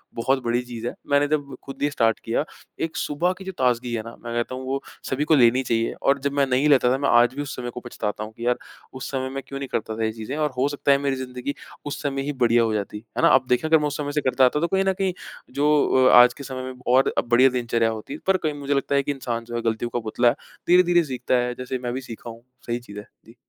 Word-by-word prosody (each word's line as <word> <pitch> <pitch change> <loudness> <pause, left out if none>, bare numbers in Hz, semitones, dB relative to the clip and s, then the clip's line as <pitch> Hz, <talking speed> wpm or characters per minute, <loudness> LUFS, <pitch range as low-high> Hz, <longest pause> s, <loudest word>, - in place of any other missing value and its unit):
"बहुत 130 +3 0
बड़ी 120 +1 +1
चीज़ 120 -1 -6
है।" - - -3 0.2
मैंने 145 0 +4
जब 145 -3 -2
ख़ुद 135 - -9
ही 145 - +2
स्टार्ट 115 -5 +1
किया, 115 +5 0 0.4
एक 160 -1 -2
सुबह 170 +5 0
की 190 - -10
जो 190 - -4
ताज़गी 125 -1 +1
है 115 - -1
ना, 115 - -9
मैं 120 0 -5
कहता 120 +2 -2
हूँ 130 - -6
वो 135 +1 -2 0.3
सभी 135 +3 0
को 160 - +7
लेनी 125 -1 +4
चाहिए। 115 -2 0
और 140 +1 +3
जब 140 +1 -1
मैं 140 -1 +3
नहीं 130 +3 +2
लेता 130 -3 +5
था, - - +1
मैं 140 +1 0
आज 120 +1 +5
भी 145 - -3
उस 145 - -5
समय 120 -1 -5
को 125 - -7
पछताता 110 -3 -4
हूँ, 110 - -8
कि 120 - -6
यार 125 0 +2 0.4
उस 130 - -6
समय 130 -1 -2
मैं 135 - -4
क्यों 135 0 -6
नहीं 135 - -4
करता 110 0 -2
था 115 - -1
यह 110 - 0
चीज़ें? 110 +4 -6
और 150 -1 +1
हो 130 +3 +2
सकता 145 0 +1
है 140 - +6
मेरी 140 -1 -1
ज़िंदगी 130 +1 -5 0.3
उस 145 - -4
समय 135 -2 -2
ही 145 +1 -3
बढ़िया 115 0 +4
हो 110 -1 0
जाती। 105 0 -3 0.2
है - - +1
ना? - - +6
आप 130 -1 +4
देखें, 125 +6 +2
अगर 160 0 +6
मैं 150 - 0
उस 145 - -4
समय 145 -1 -3
से 150 0 0
करता 130 -1 +4
था, 150 - -2
तो 170 - +1
कहीं 190 +1 +1
न 190 - +2
कहीं 190 -1 -1 0.4
जो 145 +1 +1 0.4
अ, - - +5
आज 125 - +3
के 140 - -10
समय 130 -1 -6
में 130 0 -7
बहुत 125 +1 +2
बढ़िया 125 +2 +5
दिनचर्या 120 -2 0
होती। 110 +6 -6
पर 190 -1 +4
कहीं 155 -4 -2
मुझे 140 0 -1
लगता 140 0 0
है 140 - +3
कि 145 - -1
इंसान 120 -4 -4
जो 120 0 -7
है, 120 - -1
गलतियों 115 +1 -1
का 120 - 0
पुतला, 120 +2 +2 0.4
धीरे-धीरे 175 -1 +5
सीखता 130 -3 -1
है, 125 0 +1
जैसे 130 0 -4
मैं 120 0 -2
भी 130 - -3
सीखा 120 -1 -9
हूँ, 115 +1 -11 0.2
सही 120 +1 -1
चीज़ 105 -4 -10
है। 105 - -11 0.2
जी। 115 - -17
130 Hz, 285 wpm, -23 LUFS, 120-140 Hz, 0.4 s, को